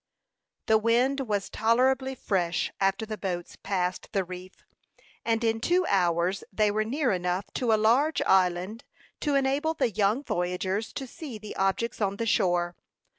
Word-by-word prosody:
The 220 0 +4
wind 245 +5 +2
was 210 -7 -1
tolerably 260 +4 +2
fresh 180 -7 -1
after 195 +3 +1
the 215 -2 -6
boats 180 -3 -4
passed 185 -2 -2
the 195 - +1
reef, 185 +1 -10 0.6
and 230 0 0
in 225 0 +1
two 350 +9 +2
hours 180 - +1
they 210 +1 +2
were 215 +1 +1
near 265 +4 0
enough 180 +1 -1 0.2
to 240 -3 +2
a 220 - +5
large 250 +9 +3
island 185 +4 +2 0.4
to 290 -2 0
enable 275 +4 +1
the 235 - +1
young 215 +6 +1
voyagers 185 +2 -2
to 270 - -4
see 260 -2 -8
the 210 0 -9
objects 195 +5 -1
on 200 -1 +1
the 230 - -2
shore. 175 -4 +1
215 Hz, 160 wpm, -27 LUFS, 185-245 Hz, 0.6 s, a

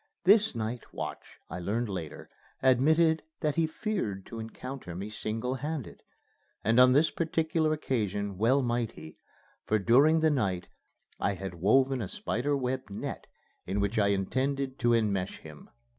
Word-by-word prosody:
This 205 - +5
night 115 +1 -4
watch, - - -7
I 90 - -6
learned 110 +7 -1
later, 90 -7 -6 0.4
admitted 155 +5 +4 0.2
that 150 -1 +1
he 165 +1 +2
feared 155 - -3
to 115 - -8
encounter 115 -3 -7
me 100 +4 -5
single 110 +4 -3
handed. 150 -4 -5 0.6
And 115 +3 +3
on 125 0 +7
this 150 +4 +4
particular 160 -1 0
occasion 105 -9 -2
well 130 +5 +3
might 120 -2 -1
he, 80 +1 -12 0.5
for, 110 - +3
during 140 +10 +5
the 160 -1 +4
night, 95 -10 -1 0.5
I 100 - 0
had 95 0 -6
woven 130 +9 +3
a 100 - -3
spider 140 +10 -1
web 130 -2 -3
net 100 - -6 0.4
in 95 +3 -1
which 100 +3 0
I 100 - +4
intended 130 +7 -1
to 120 0 +3
enmesh 100 -4 0
him. 75 -2 -13
120 Hz, 155 wpm, -29 LUFS, 100-140 Hz, 0.6 s, on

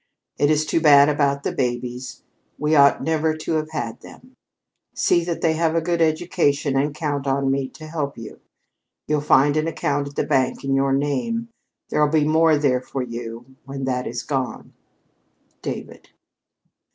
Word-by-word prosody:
"It 145 - +3
is 155 0 +2
too 165 - 0
bad 145 -2 +7
about 140 -1 +1
the - - -1
babies. 125 0 -4 0.3
We 150 +1 +1
ought 140 -1 +5
never 160 0 0
to 155 - -5
have 155 0 -3
had 120 -8 -4
them. 255 - -15 0.6
See 170 - +2
that 170 -1 -3
they 160 -1 +2
have 160 0 0
a - - +4
good 170 +1 -1
education 155 -3 +1
and 145 +2 0
count 145 -3 -3
on 135 0 +1
me 135 -1 -1
to 155 - -12
help 155 -3 -4
you. 115 -2 -10 0.7
You'll 150 -1 0
find 145 0 +4
an 155 +1 0
account 145 -3 -1
at 140 - -11
the - - 0
bank 135 -4 0
in 135 0 -1
your 135 0 +2
name. 145 - -1 0.4
There'll 150 -1 +2
be 155 -1 +2
more 160 0 +4
there 135 -4 +1
for 130 0 -4
you 115 -1 -7 0.2
when 135 0 -6
that 125 -1 -1
is 120 0 -4
gone. 135 -3 -4 0.9
"DAVID." - - -7
145 Hz, 175 wpm, -22 LUFS, 135-155 Hz, 0.9 s, bad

